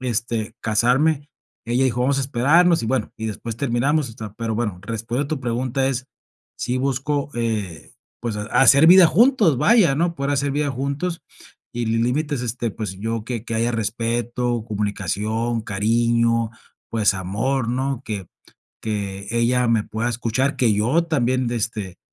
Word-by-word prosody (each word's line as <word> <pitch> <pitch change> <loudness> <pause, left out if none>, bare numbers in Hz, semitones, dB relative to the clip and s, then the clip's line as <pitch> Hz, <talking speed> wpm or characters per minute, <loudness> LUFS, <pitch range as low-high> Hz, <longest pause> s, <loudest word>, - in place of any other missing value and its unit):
este, 115 -2 -2
casarme. 135 +7 +2 0.4
Ella 120 +3 +1
dijo: 125 -2 0
"Vamos 135 +2 +2
a - - 0
esperarnos" 150 +7 +3
y - - -2
bueno 125 -1 -1
y 110 - -3
después 110 +1 -5
terminamos, 140 +3 +1
o - - -11
sea. 110 -2 -8
Pero 115 -1 -2
bueno, 105 -5 -2
respondiendo 115 +6 -3
a - - -5
tu - - -16
pregunta 125 +2 -1
es, 130 0 -3 0.5
sí 125 +2 -2
busco, 140 +2 -1
eh, 110 -8 -3 0.3
pues, 115 -3 -3
ha 105 - -3 0.2
hacer 140 +3 +7
vida 180 0 +9
juntos, 215 - +4
vaya, 205 - +4
¿no? 170 +3 0
Poder 140 -1 -2
hacer 140 0 0
vida 145 0 0
juntos 140 +6 -3 0.5
y 120 0 -2
li 115 +1 +1
límites, 145 +3 -1
este, 120 -1 -2
pues, 105 -2 -5
yo 110 +1 -3
que, 120 -2 -4
que 115 - -4
haya 115 +2 +1
respeto, 120 +1 -1
comunicación, 105 +3 -2
cariño, 115 +2 +1 0.4
pues, 110 -3 +2
amor, 110 +7 -1
¿no? 130 +1 -1
Que 100 -4 -4 0.6
que 100 -2 -4
ella 120 +1 +2
me 115 -2 +2
pueda 115 +2 -2
escuchar, 120 +4 -1
que 120 -4 +3
yo 120 +11 +2
también, 130 -5 0
este, 105 -6 -3
120 Hz, 165 wpm, -22 LUFS, 110-135 Hz, 0.6 s, vida